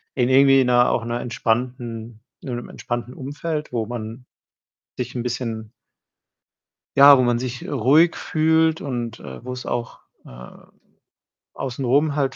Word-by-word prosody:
in 125 -2 +1
irgendwie 135 0 +6
'ner 125 -1 +4
auch 115 - 0
'ner 120 +1 -2
entspannten 120 -1 -3 0.2
in 125 - -5
'nem 120 - -7
entspannten 120 0 -5
Umfeld, 150 +3 -5
wo 115 -2 -1
man 120 +1 -7 0.7
sich 125 0 -4
'n 120 - -2
bisschen 115 -3 -4 1.3
ja, 140 0 +9
wo 130 - +3
man 120 -1 +1
sich 125 -1 -5
ruhig 145 +6 +3
fühlt 160 0 +2
und, 120 -4 -4
äh, 65 - -10
wo's 125 0 -6
auch, 120 -1 -4 0.3
ähm, 60 0 -14 0.8
außenrum 135 +3 0
halt 140 -2 0
125 Hz, 135 wpm, -22 LUFS, 120-135 Hz, 1.3 s, ja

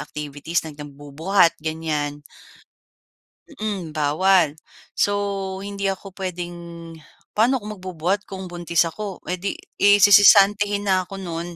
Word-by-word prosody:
activities, 150 +3 -4
na 155 - -7
nagbubuhat, 145 +5 0
ganyan. 150 -2 -3 1.3
Mm, 195 - -5
bawal. 155 +1 +2 0.3
So 205 - +1 0.5
hindi 200 0 -3
ako 195 0 -4
puwedeng, 180 -2 -5 0.8
paano 240 +5 +2
ako - - -10
magbubuhat 185 +2 -2
kung 190 -1 -7
buntis 170 -1 +1
ako 195 +3 -6
eh 180 - -3
'di, 195 +2 -3 0.2
eh, 205 0 +6
sisisantehen 205 0 +6
na 185 -2 +1
ako 195 - -8
no'n 170 -2 -6
180 Hz, 120 wpm, -22 LUFS, 160-200 Hz, 1.3 s, eh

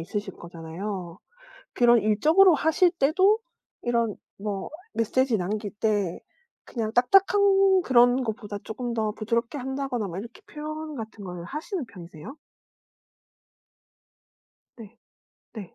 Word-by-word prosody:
있으실 200 +3 -5
거잖아요. 170 +2 -7 0.6
그런 240 -1 +5
일적으로 315 - +5
하실 320 +4 +3
때도 370 +7 +3 0.4
이런 235 -3 0 0.2
뭐 200 -1 -4 0.2
메시지 235 +1 +1
남길 205 +3 -3
때 205 -5 0 0.5
그냥 225 -3 -3
딱딱한 390 +7 +4
그런 245 -1 +4
것보다 210 -3 -5
쪼끔 240 +2 -5
더 220 -2 -1
부드럽게 230 +4 -2
한다거나 265 -4 -3
뭐 175 0 -6
이렇게 235 - -9
표현 310 -3 -6
같은 220 -3 -8
걸 180 -2 -7
하시는 310 - -4
편이세요? 175 - -11 2.4
네. 230 0 -13 0.6
네. 205 -6 -9
230 Hz, 250 characters per minute, -26 LUFS, 205-295 Hz, 2.4 s, 그런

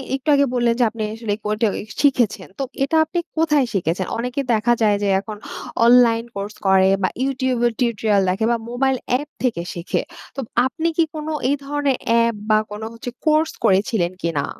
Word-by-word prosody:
একটু 270 +3 -8
আগে 280 0 +4
বললেন, 240 -1 +2
যে 245 - +5
আপনি 230 0 -8
আসলে 225 -2 -3
কো - - -1
টে 225 - +4 0.3
শিখেছেন। 240 -9 +2
তো - - 0 0.2
এটা 300 +4 0
আপনি 350 - -2 0.2
কোথায় 300 -4 +3
শিখেছেন? 185 -1 -1
অনেকে 250 +4 -2
দেখা 225 +2 +3
যায়, 210 -2 +4
যে - - +1
এখন 210 +1 -7 0.5
অনলাইন 235 -1 +5
কোর্স 200 +1 -5
করে, 190 0 +5
বা 185 - +2
YouTube 260 -2 0
এর 235 - -2
টিউটোরিয়াল 220 -4 +2
দেখে 195 +5 0
বা 235 - +2
মোবাইল 265 +2 +1 0.2
অ্যাপ 280 +4 +1 0.2
থেকে 230 -9 0
শিখে। 170 0 -2 0.3
তো 275 - -6 0.3
আপনি 325 +5 -1
কি 335 - +5
কোনো 310 +1 -4 0.2
এই 285 - +3
ধরনের 285 -2 0
অ্যাপ, 230 0 +3 0.2
বা 215 - +5
কোনো 210 +1 -6
হচ্ছে 235 +2 -7 0.2
কোর্স 310 +1 +3 0.2
করেছিলেন 190 -2 +2
কি 170 - +1
না? - - -1
235 Hz, 190 wpm, -21 LUFS, 210-270 Hz, 0.5 s, যে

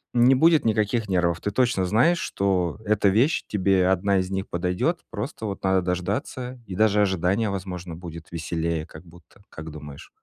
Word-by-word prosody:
не 120 +2 +6
будет 160 +4 +4
никаких 110 0 +1
нервов, 90 -3 +1
ты 105 - -3
точно 120 -4 +1
знаешь, 125 - +3
что 95 -2 -1
эта 105 -1 +3
вещь, 120 +11 +2
тебе 95 -2 +2
1 95 +1 +2
из 95 +1 -3
них 95 0 -3
подойдёт, 90 - -1
просто 110 +1 -5
вот 100 -2 -5
надо 95 -1 +2
дождаться, 100 +8 -3
и 95 - -7
даже 105 +1 +3
ожидание 95 +2 +1
возможно 90 -3 -5
будет 85 -1 -10
веселее 85 -1 -3
как 80 - -12
будто, 85 +4 -19
как 80 0 -9
думаешь? 75 -2 -10
95 Hz, 170 wpm, -24 LUFS, 90-110 Hz, -, не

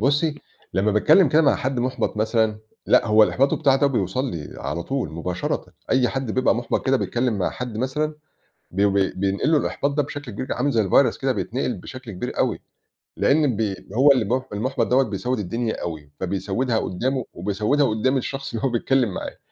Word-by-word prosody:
بُصّي، 145 +5 +2 0.4
لمّا 100 +3 +2
باتكلّم 155 - +5
كده 155 +3 +4
مع 140 - +4
حد 130 -2 -2
مُحبط 125 -2 -1
مثلًا، 110 0 +1 0.3
لأ، - - +4
هو 110 0 +6
الإحباط 135 +5 +3
بتاعه 135 -2 +3
ده 140 - +3
بيوصّل 125 +1 -1
لي 80 -4 -7
على 85 - -3
طول 135 +4 -2
مباشرًة، 85 +2 -3 0.2
أي 130 -2 +3
حد 135 -3 -3
بيبقى 130 +4 +2
مُحبط 120 +1 -2
كده 135 0 +4
بيتكلّم 120 -3 -1
مع 95 - 0
حد 125 -3 -6
مثلًا، 150 +6 -1 0.6
بي 100 +3 +2
ب 100 - +1 0.3
بينقل 100 +9 +1
له 155 - +5
الإحباط 140 - -1
ده 145 +1 +1
بشكل 145 -2 -7
كبير، 120 +6 -4
عامل 145 - 0
زي 110 -6 +1
الvirus - - +4
كده، - - +1
بيتنقل - - -2
بشكل 130 -4 -9
كبير 90 - -5
أوي، - - 0 0.6
لأن 145 -4 +3
بي 105 -2 -1 0.2
هو 135 +5 +6
اللي 130 -4 +3
المُح 125 +5 -1
المُحبَط 125 +6 -1
دوّة 130 +2 +4
بيسود 125 +2 -2
الدنيا 110 +4 -2
أوي، 75 -4 -6
فبيسودها 100 +6 -1
قدامه، 130 +6 -2
وبيسودها 105 +10 +1
قدام 130 +4 +1
الشخص 135 +1 -4
اللي 115 +2 -2
هو - - +3
بيتكلم 120 -2 +1
معاه. - - -6
125 Hz, 190 wpm, -23 LUFS, 105-135 Hz, 0.6 s, هو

